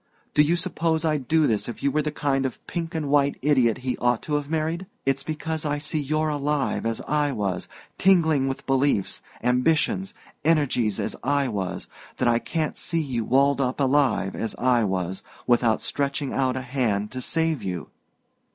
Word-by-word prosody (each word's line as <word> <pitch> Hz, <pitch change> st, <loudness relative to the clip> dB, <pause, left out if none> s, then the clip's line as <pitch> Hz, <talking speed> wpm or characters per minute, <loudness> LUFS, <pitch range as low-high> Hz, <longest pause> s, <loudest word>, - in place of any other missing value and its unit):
Do 150 Hz, -, +5 dB
you 155 Hz, +3 st, +3 dB
suppose 165 Hz, -1 st, 0 dB
I'd 150 Hz, -5 st, 0 dB
do 160 Hz, +1 st, +4 dB
this 110 Hz, -2 st, 0 dB
if 120 Hz, -, -8 dB
you 140 Hz, -, +2 dB
were 150 Hz, -, +1 dB
the 150 Hz, 0 st, -2 dB
kind 140 Hz, -2 st, 0 dB
of 130 Hz, -, -8 dB
pink 165 Hz, -2 st, -4 dB
and 155 Hz, -3 st, -1 dB
white 140 Hz, 0 st, +3 dB
idiot 130 Hz, -6 st, +3 dB
he 125 Hz, -, -1 dB
ought 120 Hz, -1 st, +1 dB
to 150 Hz, -, -4 dB
have 145 Hz, -1 st, -1 dB
married? 160 Hz, +3 st, -1 dB, 0.2 s
It's 135 Hz, 0 st, +1 dB
because 155 Hz, +1 st, -3 dB
I 145 Hz, -1 st, 0 dB
see 150 Hz, +1 st, -2 dB
you're 155 Hz, +2 st, 0 dB
alive, 145 Hz, -4 st, 0 dB
as 115 Hz, -1 st, -2 dB
I 150 Hz, -1 st, +1 dB
was, 95 Hz, -5 st, -2 dB, 0.3 s
tingling 160 Hz, -8 st, +4 dB
with 135 Hz, -, -4 dB
beliefs, 135 Hz, -6 st, +1 dB, 0.2 s
ambitions, 150 Hz, +9 st, +1 dB, 0.3 s
energies, 145 Hz, -9 st, +2 dB
as -, -, -2 dB
I 140 Hz, +1 st, +1 dB
was 95 Hz, -5 st, -3 dB, 0.3 s
that 125 Hz, -, +1 dB
I 120 Hz, 0 st, +4 dB
can't 155 Hz, +4 st, -2 dB
see 165 Hz, -, -1 dB
you 130 Hz, -7 st, -1 dB
walled 140 Hz, +4 st, +3 dB
up 130 Hz, +1 st, -1 dB
alive, 135 Hz, -8 st, +2 dB
as 115 Hz, -, -3 dB
I 125 Hz, -2 st, +3 dB
was, 95 Hz, -1 st, -2 dB, 0.2 s
without 120 Hz, -2 st, +3 dB
stretching 140 Hz, 0 st, -2 dB
out 130 Hz, -1 st, +1 dB
a -, -, -2 dB
hand 120 Hz, -6 st, -1 dB
to 130 Hz, -, -5 dB
save 160 Hz, 0 st, 0 dB
you!" 90 Hz, -8 st, -4 dB
140 Hz, 185 wpm, -25 LUFS, 120-155 Hz, 0.3 s, Do